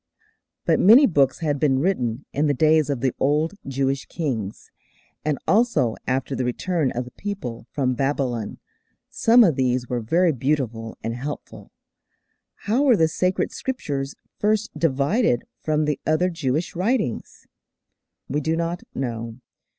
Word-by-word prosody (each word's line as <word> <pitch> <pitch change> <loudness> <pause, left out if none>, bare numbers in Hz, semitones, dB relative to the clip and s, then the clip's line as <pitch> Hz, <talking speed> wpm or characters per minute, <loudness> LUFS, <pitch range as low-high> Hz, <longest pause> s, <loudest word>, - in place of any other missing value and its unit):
But - - +3
many 235 +9 +8
books 140 - +2
had 145 -3 0
been 135 -3 +3
written 130 -6 -1
in 150 +2 +1
the 145 - +1
days 155 +2 +3
of 135 -4 -2
the 130 -2 +1
old 150 +5 +1
Jewish 135 0 -1
kings, 115 - -4 0.5
and 150 -2 0
also 210 - +2
after 130 +1 -1
the 130 - -1
return 150 +4 0
of 125 +1 -3
the 125 - -12
people 185 - -6
from 130 -3 0
Babylon: 130 -4 -1 0.5
some 235 +2 +5
of 170 -9 +3
these 125 -1 0
were 125 - -1
very 165 +10 +2
beautiful 125 -5 -2
and 115 - -2
helpful. 140 +5 -7 0.9
How 225 +6 +2
were 265 -6 +5
the 160 - +4
sacred 180 +3 0
Scriptures 140 - -4 0.2
first 215 +1 +1
divided 145 - +1 0.2
from 155 -1 +1
the 150 -1 -1
other 175 +4 +2
Jewish 155 0 -2
writings? 185 - -2 0.8
We 145 +3 -1
do 160 +3 0
not 170 +1 -2
know. 115 -3 -4
145 Hz, 145 wpm, -23 LUFS, 130-170 Hz, 0.9 s, many